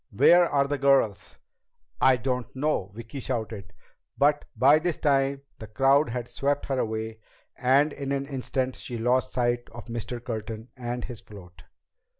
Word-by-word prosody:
Where 170 - +5
are 140 -1 +2
the 145 0 -2
girls?" 130 -9 +2 0.7
"I 130 -1 +6
don't 125 +1 -3
know!" 130 -9 -1
Vicki 115 +4 -7
shouted. 110 -6 -4 0.5
But 145 +1 +3
by 135 +6 +6
this 170 0 -1
time 140 -1 +1 0.2
the 110 - -8
crowd 135 +6 +3
had 120 0 -4
swept 140 +2 -1
her 135 -2 -1
away, 110 0 -3 0.4
and 135 +4 +3
in 140 -1 -5
an 140 0 -1
instant 130 -1 -2
she 120 - -6
lost 125 +3 +1
sight 120 -1 0
of 120 - -10
Mr. 120 +1 -5
Curtin 110 -1 -6
and 120 -1 -4
his 120 -3 -7
float. 90 -5 -14
125 Hz, 155 wpm, -26 LUFS, 115-140 Hz, 0.7 s, I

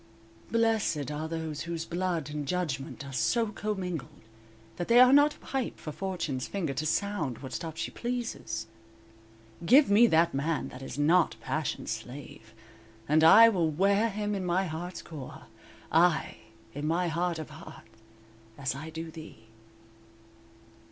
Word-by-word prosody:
_"Blessed 220 - +1
are 155 +2 -4
those 160 -2 -4
whose 170 -1 -4
blood 175 -4 -2
And 150 -1 -4
judgment 150 -6 -3
are 140 - -9
so 225 - +1
commingled, 185 - -4 0.5
That 175 - -3
they 235 +1 +6
are 255 +1 +8
not 290 +1 +5
a - - -20
pipe 265 -3 -4
for 155 - -7
Fortune's 160 -8 -3
finger 170 -8 -2
'To 155 +4 -2
sound 200 - -1
what 130 -2 -8
stop 165 -2 -5
she 170 - -3
pleases.' 235 - -4 1.0
'Give 260 - +6
me 225 +4 +7
that 170 -2 +3
man 150 +4 -1
that 130 - -11
is 135 - -7
not 165 +4 +3
passion's 155 -6 -3
slave,' 115 -1 -8 0.5
And 155 +2 +4
I 225 +8 +9
will 175 -7 +1
wear 200 +7 +2
him 210 0 -2
in 195 -2 -2
my 180 +2 +1
heart's 175 +2 -6
core, 150 -6 -9 0.5
Ay, 170 0 +3 0.4
in 145 +2 -4
my 175 +3 +1
heart 170 +1 -1
of 155 - -7
heart - - -12 0.7
as 135 -3 -2
I 155 +4 -7
do 160 +1 -7
thee." 155 -8 -12
165 Hz, 150 wpm, -29 LUFS, 150-200 Hz, 1.0 s, I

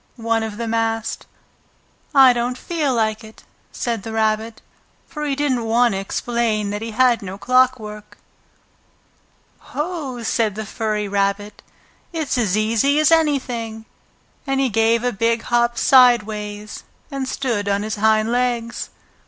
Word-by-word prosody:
one 230 -1 0
of 220 -2 -5
them 230 -1 -3
asked. 225 -1 -2 0.8
"I 270 -4 +7
don't 245 +1 -2
feel 315 -2 -1
like 220 -3 0
it," 220 0 -14 0.3
said 235 -4 -3
the 225 - -7
Rabbit, 220 0 -1 0.5
for 300 -3 -6
he 285 -2 -1
didn't 265 -5 0
want 235 +2 +3
to 195 - -2
explain 215 0 -1
that 205 +1 -4
he 225 - -4
had 245 +1 +3
no 195 -1 -7
clockwork. 240 -3 0 1.4
"Ho!" 295 -7 -5
said 220 -2 0
the 220 0 -5
furry 210 -1 -2
rabbit. 200 +1 -1 0.5
"It's 320 -5 -2
as 215 -5 +1
easy 230 +7 +2
as 310 +1 +4
anything," 250 -8 0 0.6
And 270 0 0
he 270 -1 +2
gave 225 +1 +2
a 245 - 0
big 230 +3 0
hop 235 0 +1
sideways 215 -5 +2 0.3
and 270 -1 -3
stood 230 -8 -2
on 200 +1 0
his 215 -1 -4
hind 220 +1 +2
legs. 240 -1 -1
230 Hz, 145 wpm, -20 LUFS, 215-255 Hz, 1.4 s, I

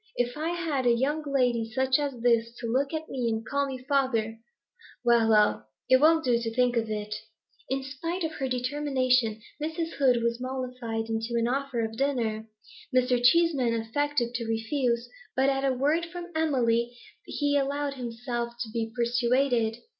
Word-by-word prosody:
If 245 0 -1
I 310 +2 -2
had 320 -7 -1
a - - +6
young 290 +6 0
lady 240 -4 +1
such 260 +3 +2
as 275 -5 -3
this 230 -1 +2
to 240 - -7
look 265 +5 0
at 315 -1 -4
me 250 -3 -2
and 220 0 -2
call 280 +2 0
me 265 -1 -4
father 235 -6 +1 0.7
well, 235 -2 +4
well, 210 -1 +3 0.2
it 260 +1 +6
won't 320 +1 +5
do 240 -2 +3
to 225 -1 -4
think 250 0 +2
of 225 -1 0
it.' 210 0 -3 0.6
In 265 0 -1
spite 330 +7 -4
of 320 - -1
her 270 - 0
determination, 255 -4 +1 0.2
Mrs. 325 +2 -3
Hoed 250 -4 +3
was 235 +1 -1
mollified 250 -3 -4
into 225 +1 -2
an 230 0 +1
offer 260 -2 -1
of 225 0 -7
dinner. 230 -5 -1 0.4
Mr. 250 -1 +2
Cheeseman 270 -4 +4
affected 245 +1 -1
to 230 -1 -3
refuse, 235 +1 0 0.3
but 265 +1 +3
at 270 0 0
a 270 - +3
word 295 +6 +1
from 350 +1 -8
Emily 240 -6 +1 0.3
he 290 -1 0
allowed 285 0 0
himself 240 -1 -4
to 225 - -4
be 225 -1 -2
persuaded. 240 -1 +1
250 Hz, 170 wpm, -27 LUFS, 235-280 Hz, 0.7 s, a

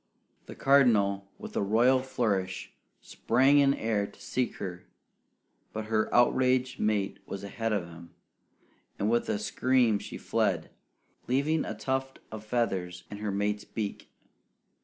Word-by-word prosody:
The - - -9
Cardinal, 105 -8 +3
with - - -9
a - - +1
royal 120 +6 +4
flourish, 105 -8 -2 0.3
sprang 135 +5 +3
in 140 0 +4
air 105 -3 -1
to - - -18
seek 125 -1 -2
her; 90 -2 -7 0.9
but 110 0 -4
her 110 0 +1
outraged 130 +1 +3
mate 105 -2 0
was 100 0 -6
ahead 115 +3 -3
of 100 -4 0
him, 85 0 -12 0.9
and 105 +2 0
with 120 - +1
a - - +1
scream 120 0 +2
she - - -8
fled, - - -1 0.6
leaving 145 +5 +1
a - - -4
tuft 135 0 -2
of 110 -1 -7
feathers 95 -6 -2
in 105 - -6
her 105 0 -3
mate's 105 +1 -1
beak. 105 -1 -5
110 Hz, 140 wpm, -29 LUFS, 100-130 Hz, 0.9 s, royal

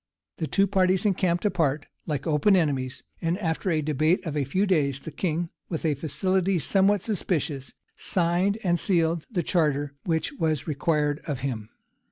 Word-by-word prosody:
The 160 - -2
two 195 +5 +3
parties 190 0 +2
encamped 185 -2 +1
apart, 155 -7 +1 0.2
like 150 -3 -2
open 160 +5 +4
enemies; 135 -7 0 0.2
and 170 +1 0
after 175 -1 -1
a 155 -3 +1
debate 155 +5 +1
of 155 -3 -3
a 145 -2 0
few 185 +10 +1
days, 145 -8 +1
the 160 - -7
king, 170 +1 -2 0.2
with 165 -1 -3
a 155 - +3
facility 185 +6 0
somewhat 195 +5 +3
suspicious, 155 - -2 0.2
signed 180 +3 +1
and 175 -2 +2
sealed 165 -3 +1
the 185 -8 -1
charter 145 -4 +1
which 165 - -1
was 160 - -1
required 150 -1 0
of 140 -5 -3
him. 115 -5 -3
165 Hz, 165 wpm, -26 LUFS, 150-185 Hz, 0.2 s, open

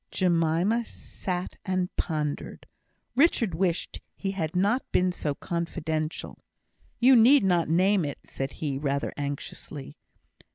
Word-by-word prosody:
Jemima 175 +5 +2
sat 185 -5 -5
and 185 -1 -1
pondered. 150 -3 -3 0.5
Richard 245 - +3
wished 175 +1 -1
he 195 - -3
had 165 -5 -3
not 205 +8 +2
been 180 0 +3
so 150 -5 -2
confidential. 160 -2 -3 0.6
"You 255 +2 +7
need 250 +4 +7
not 175 -4 +2
name 185 +3 +3
it," 145 -2 -3
said 135 0 -4
he, 140 -3 -3
rather 140 -1 -1
anxiously. 140 0 -6
175 Hz, 120 wpm, -27 LUFS, 155-195 Hz, 0.6 s, You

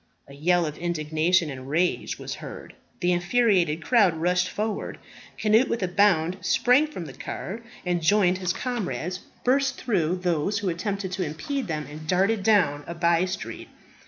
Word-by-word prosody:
A 140 - -13
yell 175 +4 +2
of 150 -1 -5
indignation 165 0 +1
and 130 0 -8
rage 175 +4 0
was - - -6
heard. - - -9 0.3
The 180 0 +2
infuriated 175 -3 +2
crowd 205 -9 +4
rushed 180 +2 +1
forward. 215 +1 -3 0.4
Cnut, 220 +4 +3
with 230 - -1
a - - +1
bound, 180 -2 +2
sprang 255 +5 +3
from 185 - -7
the 135 - -9
car, 190 - -6 0.2
and, 175 -1 0
joining 185 +1 +3
his 180 -1 -1
comrades, 185 -6 -3 0.2
burst 270 +1 +2
through 180 -7 0
those 175 +3 0
who 205 -2 -1
attempted 190 +2 -3
to 185 0 -2
impede 180 - -3
them, 155 -3 -3
and 155 +2 -9
darted 195 +5 +2
down 180 -9 +3
a 170 - -5
by 170 +1 +2
street. 185 +1 -6
180 Hz, 165 wpm, -25 LUFS, 165-205 Hz, 0.4 s, crowd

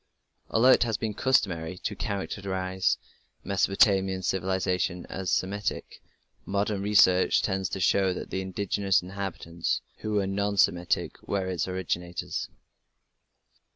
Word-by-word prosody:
Although 125 +4 +5
it - - +5
has 115 -3 +1
been 110 -1 -3
customary 95 -9 +1
to - - -4
characterize 95 -2 -2 0.5
Mesopotamian 95 -1 +2
civilization 90 -1 -1
as 95 -2 -3
Semitic, 100 +2 -2 0.4
modern 100 0 -1
research 100 -3 +4
tends 95 -2 -1
to 95 - -4
show 95 +1 +3
that 90 - -6
the 95 - -1
indigenous 95 0 0
inhabitants, 90 -3 -3
who 110 - -4
were 100 -2 +2
non 100 +1 -1
Semitic, 90 -2 +1
were 100 -2 -1
its 90 -2 -2
originators. 90 -1 -3
95 Hz, 120 wpm, -27 LUFS, 90-100 Hz, 0.5 s, Although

